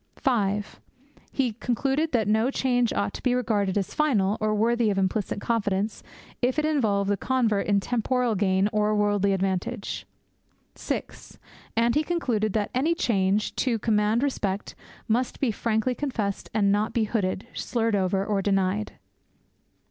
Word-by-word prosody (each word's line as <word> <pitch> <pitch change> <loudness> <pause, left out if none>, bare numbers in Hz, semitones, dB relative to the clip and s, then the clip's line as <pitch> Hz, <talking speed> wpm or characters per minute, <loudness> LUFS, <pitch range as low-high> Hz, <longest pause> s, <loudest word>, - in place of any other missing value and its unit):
(5) 210 -6 -1 0.5
He 255 -5 0
concluded 270 +7 -1
that 225 -5 +1
no 220 +4 +2
change 245 -3 +1
ought 200 0 -1
to - - -7
be 250 -1 +2
regarded 210 -6 0
as 195 - -2
final 215 -10 +2
or 215 0 +1
worthy 230 +1 +2
of 200 - 0
implicit 195 +1 0
confidence 205 -2 -1 0.4
if 250 +2 +1
it 305 - +2
involved 220 -10 +1
the 205 - +2
convert 225 -4 +1
in 200 -1 +3
temporal 245 +2 0
gain 190 -1 +2
or 210 0 +2
worldly 205 -1 +2
advantage. 190 0 -2 0.7
(6) - - -6 0.4
And 235 +1 +3
he 300 - +3
concluded 245 - -1
that 210 -2 -1
any 295 +7 +1
change, 200 -5 +1
to 245 -4 +1
command 215 +2 +1
respect, 205 -8 -2 0.3
must 240 +3 0
be 260 -5 +1
frankly 220 +3 0
confessed, 235 -8 -3
and 205 -2 +2
not 210 +2 +1
be 230 - +2
hooded, 205 -3 -1
slurred 230 -3 -1
over, 195 0 +1
or 205 -2 0
denied. 195 +1 0
215 Hz, 150 wpm, -26 LUFS, 200-245 Hz, 0.7 s, in